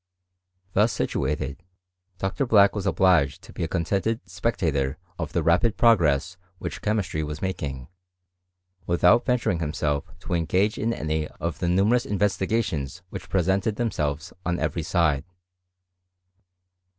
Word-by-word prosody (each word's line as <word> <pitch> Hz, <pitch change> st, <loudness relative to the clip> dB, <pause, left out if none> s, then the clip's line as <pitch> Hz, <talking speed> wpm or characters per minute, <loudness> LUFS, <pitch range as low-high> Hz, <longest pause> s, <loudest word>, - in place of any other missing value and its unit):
Thus 105 Hz, +3 st, +4 dB
situated, 70 Hz, +2 st, -2 dB, 0.6 s
Dr. 95 Hz, +8 st, -1 dB
Black 100 Hz, -3 st, +6 dB
was 100 Hz, -2 st, -3 dB
obliged 90 Hz, -9 st, +3 dB
to -, -, -13 dB
be -, -, -4 dB
a -, -, 0 dB
con— 85 Hz, 0 st, -1 dB
• -, -, -9 dB
tented 110 Hz, +3 st, 0 dB
spectator 75 Hz, -, -1 dB, 0.2 s
of 80 Hz, -3 st, -3 dB
the 85 Hz, -, 0 dB
rapid 90 Hz, +8 st, +3 dB
progress 90 Hz, -, +3 dB, 0.2 s
which -, -, -6 dB
chemistr]^* 105 Hz, -7 st, -1 dB
was 75 Hz, 0 st, -5 dB
making, 70 Hz, -9 st, -4 dB, 1.0 s
without 90 Hz, +7 st, +4 dB
venturing 115 Hz, -9 st, +1 dB
himself 75 Hz, -2 st, -1 dB, 0.2 s
to -, -, -4 dB
engage 95 Hz, +5 st, +1 dB
inm^ 115 Hz, +2 st, 0 dB
any 80 Hz, 0 st, -1 dB
of 85 Hz, +1 st, -5 dB
the 85 Hz, -, 0 dB
numerous 105 Hz, +7 st, +3 dB
investigations 95 Hz, -, -1 dB
which -, -, -7 dB
presenteA 95 Hz, +4 st, +1 dB
themselves 80 Hz, -, -2 dB
on 90 Hz, -1 st, 0 dB
every 85 Hz, -, -1 dB
side. 80 Hz, -4 st, +1 dB
90 Hz, 135 wpm, -25 LUFS, 75-105 Hz, 1.0 s, Black